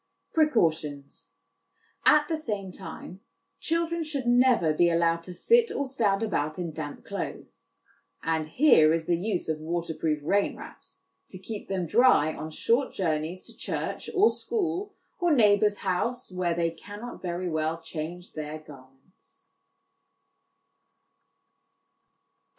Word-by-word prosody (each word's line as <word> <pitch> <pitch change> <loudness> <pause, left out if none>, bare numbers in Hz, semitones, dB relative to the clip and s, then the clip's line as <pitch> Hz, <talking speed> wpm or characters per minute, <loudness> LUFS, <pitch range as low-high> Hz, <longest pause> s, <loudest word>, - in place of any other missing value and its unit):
Precautions. 160 - 0 0.8
At 300 0 +6
the 320 - 0
same 205 -11 -4
time, 180 +1 -9 0.4
children 335 0 -1
should 290 -5 -4
never 240 -9 +4
be 170 +2 +4
allowed 170 0 +2
to 180 - -8
sit 470 - +4
or 280 - -1
stand 225 -6 +1
about 155 -8 -1
in 175 -2 -3
damp 150 -2 -7
clothes; - - -6 0.6
and 160 -1 0
here 160 - +5
is 165 -1 -3
the 175 - +2
use 185 +2 -2
of 160 -1 -1
waterproof 160 -1 -2
rain 200 +6 +1
wraps 375 0 -12 0.3
to 185 - -8
keep 205 +3 -7
them 190 -2 -1
dry 210 - +4
on 155 - -6
short 235 - 0
journeys 165 0 -2
to - - -12
church, - - -4
or 410 +4 +5
school, 390 -1 -2 0.2
or 350 -2 +2
neighbour's 210 -3 +4
house, 235 +6 -1
where 180 -2 -1
they 165 -1 0
cannot 205 +8 -9
very 180 0 -3
well 160 0 -1
change 165 +2 -7
their 155 0 -5
garments. 155 - -17
185 Hz, 130 wpm, -27 LUFS, 160-255 Hz, 0.8 s, At